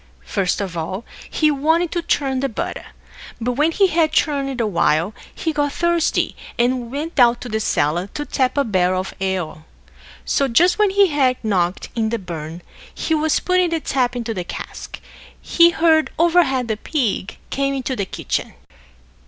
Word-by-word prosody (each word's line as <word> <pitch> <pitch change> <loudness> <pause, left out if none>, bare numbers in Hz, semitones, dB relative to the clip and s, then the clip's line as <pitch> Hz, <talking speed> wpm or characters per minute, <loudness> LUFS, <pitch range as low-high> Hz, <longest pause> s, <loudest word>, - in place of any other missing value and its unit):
First 185 - 0
of 190 -4 -4
all, 185 +7 -4 0.2
he 310 -1 +2
wanted 320 +4 +1
to 345 - -1
churn 270 -5 0
the 275 +1 -1
butter; 220 - -5 0.5
but 240 +2 -1
when 300 +6 +2
he 390 +4 +3
had 330 -3 +2
churned 275 -5 0
a 230 - +2
while, 170 -1 +1 0.2
he 320 - -3
got 290 -1 0
thirsty, 340 -1 +1 0.2
and 245 0 0
went 305 +5 -4
down 240 -3 +5
to 245 - -9
the 220 - -1
cellar 170 -2 0
to 295 - -3
tap 260 -1 0
a 280 - +4
barrel 185 -4 +1
of 190 - -8
ale. 185 -5 -2 0.6
So, 275 - +1
just 350 - +3
when 420 -1 +4
he 395 0 +4
had 265 -4 +2
knocked 185 -4 0
in 225 -2 0
the 235 - -1
bung, 170 -3 -7 0.5
and 310 -1 +3
was 315 -1 +2
putting 365 -1 +2
the 330 -1 0
tap 255 -4 0
into 235 -2 -3
the 185 -4 -3
cask, - - -8 0.4
he 340 0 +5
heard 320 -2 +3
overhead 325 -7 +3
the 220 -2 -1
pig 220 - -2
come 275 0 0
into 260 0 -2
the 200 -5 -2
kitchen. - - -3
260 Hz, 175 wpm, -20 LUFS, 200-315 Hz, 0.6 s, down